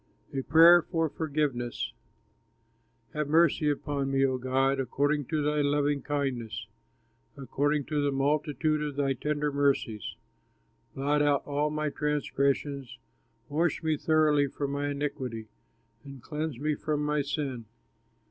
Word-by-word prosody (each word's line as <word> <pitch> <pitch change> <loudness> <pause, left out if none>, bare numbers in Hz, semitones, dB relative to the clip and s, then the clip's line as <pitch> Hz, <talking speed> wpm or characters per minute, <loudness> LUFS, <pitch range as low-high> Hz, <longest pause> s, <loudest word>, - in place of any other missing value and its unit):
A 135 - -1
PRAYER 165 +5 +7
FOR 165 -1 -1
FORGIVENESS 140 -6 -2 1.2
Have 150 -1 -2
mercy 155 -1 +3
upon 140 -1 -2
me, 135 0 +3
O 130 -1 0
God, 135 +2 +1
According 145 +3 0
to 155 +2 -1
thy 150 0 +1
loving 145 0 +1
kindness, 125 -8 -3 0.7
According 145 +2 0
to 150 +1 -1
the 145 0 +1
multitude 150 +2 0
of 150 -2 -3
thy 140 -1 +1
tender 150 +3 -1
mercies, 140 -7 0 0.8
Blot 145 +2 +1
out 145 -1 +2
all 145 +1 0
my 150 0 -2
transgressions, 140 -3 -1 0.5
Wash 160 +3 0
me 160 -1 +1
thoroughly 150 -1 +3
from 140 0 -4
mine 145 0 -1
iniquity, 130 -6 -4 0.5
And 140 -1 -10
cleanse 150 +1 -4
me 150 +2 0
from 150 0 -2
my 150 0 +1
sin. 140 -4 -3
145 Hz, 130 wpm, -28 LUFS, 135-150 Hz, 1.2 s, PRAYER